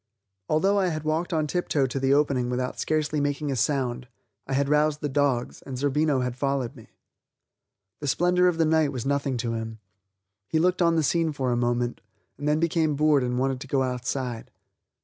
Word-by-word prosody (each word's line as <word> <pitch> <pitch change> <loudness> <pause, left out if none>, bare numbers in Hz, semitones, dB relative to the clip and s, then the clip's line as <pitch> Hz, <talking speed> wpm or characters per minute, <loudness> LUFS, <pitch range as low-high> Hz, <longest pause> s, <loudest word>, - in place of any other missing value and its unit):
Although 195 +6 +3
I 190 - +2
had 155 -3 -3
walked 155 +3 -1
on 155 -2 +1
tiptoe 150 -3 0
to 130 +1 -3
the 135 0 +1
opening 140 -4 +2
without 125 +1 -2
scarcely 155 -1 0
making 145 0 -1
a - - -1
sound, 130 -2 -1 0.4
I 135 - -3
had 140 +1 +1
roused 150 +1 +2
the 145 - -1
dogs, 140 -3 0
and 130 -2 -7
Zerbino 145 0 +1
had 125 -1 -2
followed 135 -1 -1
me. 115 -4 -14 1.1
The 145 - -5
splendor 180 +5 +3
of 175 -2 +1
the 165 - +3
night 155 -2 +2
was 125 -3 -5
nothing 140 -2 0
to 115 0 -2
him; 110 0 -5 0.7
he 160 - 0
looked 180 +3 +2
on 170 -1 +4
the 160 - +2
scene 165 +2 +1
for 130 -3 -1
a - - +1
moment, 120 0 -1 0.4
and 145 - -3
then 150 +1 +2
became 160 -2 +1
bored 150 -2 +3
and 125 0 -1
wanted 135 0 0
to 135 - -8
go 135 -1 +1
outside. 125 -1 -3
140 Hz, 200 wpm, -26 LUFS, 125-155 Hz, 1.1 s, on